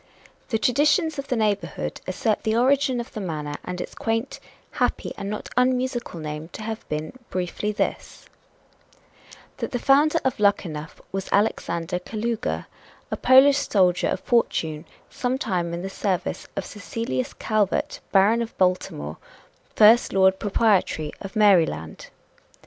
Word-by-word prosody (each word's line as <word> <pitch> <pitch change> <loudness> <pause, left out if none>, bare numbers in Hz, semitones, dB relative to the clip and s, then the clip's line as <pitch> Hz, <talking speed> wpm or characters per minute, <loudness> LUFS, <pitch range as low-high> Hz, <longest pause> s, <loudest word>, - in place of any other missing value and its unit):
The 225 - +1
traditions 295 - +2
of 275 - -5
the 250 - 0
neighborhood 200 - -1
assert 205 +3 0
the 220 0 0
origin 260 0 +3
of 235 +2 -7
the 215 - -5
manor 150 -5 -4
and 180 0 -5
its - - -6
quaint, 225 +4 -2 0.3
happy - - -1
and 195 - -5
not 210 - -5
unmusical 250 -5 0
name 150 0 -5
to - - -7
have 220 0 -6
been 155 +1 -3 0.2
briefly 185 +3 -2
this: 210 - -3 1.3
That - - -3
the 245 - -1
founder 290 +6 +4
of 260 - 0
Luckenough 170 -7 0
was 195 0 -4
Alexander 180 -4 0
Kalouga, 225 +4 -3 0.5
a - - 0
Polish 270 +2 +6
soldier 185 -7 +2
of - - -2
fortune, 160 -10 0 0.3
some 250 +1 -1
time 180 -8 -1
in 170 +1 -4
the - - -3
service 195 -1 -2
of 195 - -3
Cecilius 200 - -4
Calvert, 215 -3 0
Baron 210 +4 +4
of 230 0 -6
Baltimore, 180 - 0 0.6
first 220 +3 +6
Lord 190 0 +4
Proprietary 200 -7 +1
of 195 +2 -8
Maryland. 170 - +2
205 Hz, 140 wpm, -24 LUFS, 180-235 Hz, 1.3 s, Polish